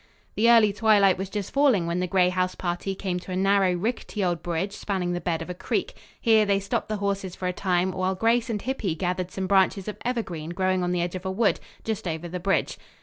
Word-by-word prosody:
The 230 +3 +3
early 225 -3 +6
twilight 205 -3 +4
was 190 0 -3
just 200 -1 -5
falling 270 -11 +3
when 170 +1 -1
the 180 - -1
Gray 180 0 +3
house 185 0 -1
party 180 +2 -3
came 185 -2 -2
to 185 - -10
a - - -2
narrow, 195 0 +3
rickety 210 +2 -2
old 175 -2 0
bridge 175 +3 -2
spanning 185 -4 -2
the 175 - -3
bed 165 -1 -1
of 165 - -11
a - - -3
creek. 175 - -2 0.3
Here 220 -2 +4
they 200 -1 +2
stopped 200 +4 -2
the 215 - -1
horses 200 -2 -2
for 185 - -3
a 180 - -1
time, 180 0 0
while 185 +1 -1
Grace 230 +4 +2
and 215 -2 -1
Hippy 225 -10 -2
gathered 180 +1 -2
some 190 0 -4
branches 195 0 +2
of 210 - -5
evergreen 190 -11 -3
growing 185 -1 +1
on 180 0 0
the 180 -1 0
edge 175 - -3
of 185 -1 -5
a - - -1
wood, 200 +2 +1 0.2
just 220 -4 -3
over 160 +1 -3
the 180 +1 -5
bridge. 195 +2 0
190 Hz, 240 wpm, -25 LUFS, 180-205 Hz, 0.3 s, early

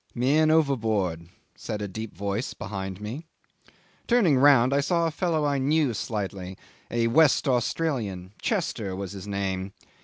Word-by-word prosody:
'"Man 145 +6 +3
overboard," 110 - +1 0.2
said 105 - -5
a 105 - -3
deep 110 +3 -7
voice 100 +4 -3
behind 95 -2 -5
me. 120 +10 -6 0.8
Turning 220 - +4
round, 130 -1 +5
I 140 - +3
saw 170 +3 +1
a 165 - 0
fellow 160 -2 0
I 140 -1 +1
knew 145 -1 +2
slightly, 100 -4 -4 0.3
a 115 0 0
West 145 +5 +4
Australian; 120 - -1
Chester 120 - -2
was 95 -1 -5
his 100 0 -8
name. 95 -1 -3
115 Hz, 145 wpm, -26 LUFS, 100-150 Hz, 0.8 s, round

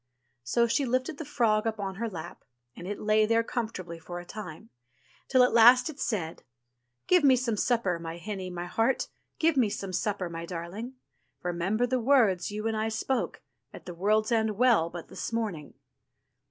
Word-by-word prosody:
So 235 - +2
she 235 +4 +1
lifted 255 +4 -1
the 320 - -5
frog 220 -4 +1
up 220 -1 -2
on 195 -1 -3
to 190 - -12
her 230 0 -1
lap, 165 -6 -8 0.3
and 175 - -8
it 205 - -4
lay 215 0 +3
there 230 +1 +3
comfortably 190 -8 -4
for 175 +2 -7
a 175 - -10
time; 210 +1 -9 0.6
till 255 -2 +5
at 250 - +3
last 245 +5 +7
it 285 - -16
said: 195 -11 -2 0.6
"Give 360 -3 +4
me 270 -2 +7
some 240 -3 -1
supper, 210 -6 +1
my 165 0 -6
hinny, 190 0 -5
my 175 -1 -5
heart, 225 +8 0 0.3
Give 325 -1 +2
me 245 -6 +3
some 195 -2 -5
supper, 195 0 -1
my 170 0 -6
darling; 185 +9 -6 0.5
Remember 180 +7 0
the 255 +1 0
words 225 -8 +3
you 210 +1 -5
and 225 - -1
I 220 +1 0
spoke. 235 +4 -2 0.3
At - - -12
the 180 - -6
World's 215 +5 +1
End 220 -3 +1
Well 230 -9 +4
but 170 -1 -8
this - - -6
morning." 210 -10 -3
215 Hz, 190 wpm, -28 LUFS, 180-240 Hz, 0.6 s, last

